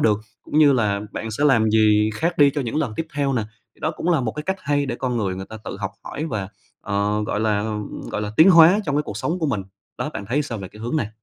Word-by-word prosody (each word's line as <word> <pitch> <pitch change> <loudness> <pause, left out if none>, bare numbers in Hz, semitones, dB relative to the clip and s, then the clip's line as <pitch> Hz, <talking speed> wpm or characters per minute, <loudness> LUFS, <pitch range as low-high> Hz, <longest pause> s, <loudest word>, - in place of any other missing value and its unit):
được, 105 -1 +3 0.2
cũng 150 - -1
như 145 -2 +7
là 105 -5 +1
bạn 110 - -4
sẽ 140 +7 -1
làm 115 -6 +4
gì 105 -1 +4
khác 170 +8 -1
đi 145 -1 +7
cho 145 +1 -2
những 120 0 -3
lần 145 -8 0
tiếp 165 - -2
theo 140 -1 0
nè, 120 - 0 0.3
thì - - -27
đó 155 - 0
cũng 175 - -3
là 160 -5 +3
một 110 -3 -2
cái 150 - -5
cách 190 +4 -2
hay 145 0 0
để 120 - -2
con 125 -2 -2
người 100 -5 -1
người 95 +1 -7
ta 110 - -8
tự - - -5
học - - -2
hỏi 155 - -5
và, 105 -9 -3 0.3
ờ, 105 +1 0
gọi 105 - -1
là, 105 -2 +1
ừm, 105 -1 -4
gọi 105 - -2
là, 105 0 -4
tiến 170 +5 +8
hóa 170 +3 +7
trong 145 -1 0
cái 150 - +2
cuộc 105 -8 -7
sống 160 +11 -2
của 160 - 0
mình, 105 -8 -1 0.4
đó, 150 - -2
bạn 100 - -6
thấy 140 +5 +1
sao 120 -6 -5
về 95 - -7
cái 105 +3 -14
hướng 120 +7 -2
này? 110 -7 -1
120 Hz, 295 wpm, -22 LUFS, 105-150 Hz, 0.4 s, tiến